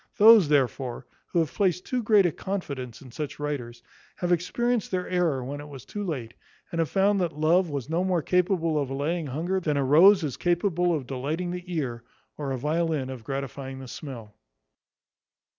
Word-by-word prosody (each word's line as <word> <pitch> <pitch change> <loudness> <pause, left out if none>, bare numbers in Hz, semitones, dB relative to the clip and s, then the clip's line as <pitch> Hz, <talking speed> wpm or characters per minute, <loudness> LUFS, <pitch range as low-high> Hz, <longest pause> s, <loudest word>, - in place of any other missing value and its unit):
Those, 215 -6 +8
therefore, 130 -3 0 0.2
who - - -3
have 165 -3 +1
placed 185 -3 +1
too 250 -1 -1
great 210 -3 +5
a 175 - +2
confidence 140 - -5
in 130 - -13
such 150 +2 -5
writers, 120 -5 -4 0.3
have 175 0 -2
experienced 230 +7 0
their 180 -1 -2
error 170 -8 +1
when 145 +2 -5
it 145 - -10
was 135 -3 -10
too 205 - -5
late; 130 - -4 0.4
and 170 - -3
have 165 - +1
found 195 0 +2
that 170 -4 -2
love 165 +3 +3
was 140 -4 -4
no 165 +3 0
more 180 -4 +1
capable 175 -4 +1
of 135 - -3
allaying 150 +4 -2
hunger, 170 +8 -1
than 150 -5 -1
a 140 - +2
rose 180 +7 +7
is 140 -5 -3
capable 175 0 +1
of 150 -6 -1
delighting 150 +8 -3
the 180 0 -6
ear, 130 -8 -2 0.3
or 145 -2 -4
a 130 - -1
violin 150 -1 -1
of 125 -4 -8
gratifying 135 +1 -5
the 135 -1 -9
smell. 120 -6 -8
155 Hz, 190 wpm, -26 LUFS, 135-180 Hz, 0.4 s, Those